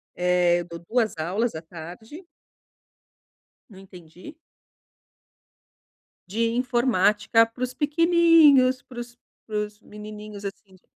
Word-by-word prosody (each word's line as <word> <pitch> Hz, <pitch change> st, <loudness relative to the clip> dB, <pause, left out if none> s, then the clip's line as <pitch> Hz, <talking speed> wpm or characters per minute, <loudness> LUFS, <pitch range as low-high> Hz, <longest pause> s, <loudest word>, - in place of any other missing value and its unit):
Eh 180 Hz, -1 st, +2 dB
eu -, -, -8 dB
dou 170 Hz, -1 st, -9 dB
2 230 Hz, -2 st, +1 dB
aulas 195 Hz, +9 st, -1 dB
à 160 Hz, -, -7 dB
tarde. 180 Hz, -, -11 dB, 1.4 s
Não 195 Hz, -, -15 dB
entendi? 185 Hz, -, -14 dB, 1.9 s
De 220 Hz, +5 st, -1 dB
informática 230 Hz, -3 st, +2 dB
para 235 Hz, +2 st, -11 dB
os 255 Hz, 0 st, -2 dB
pequenininhos, 305 Hz, -4 st, +4 dB
pros 240 Hz, -1 st, -10 dB, 0.3 s
para 215 Hz, -1 st, -3 dB
os 210 Hz, 0 st, -5 dB
menininhos 210 Hz, -1 st, -10 dB
assim 195 Hz, -1 st, -9 dB
de 185 Hz, -, -22 dB
215 Hz, 110 wpm, -24 LUFS, 185-250 Hz, 1.9 s, pequenininhos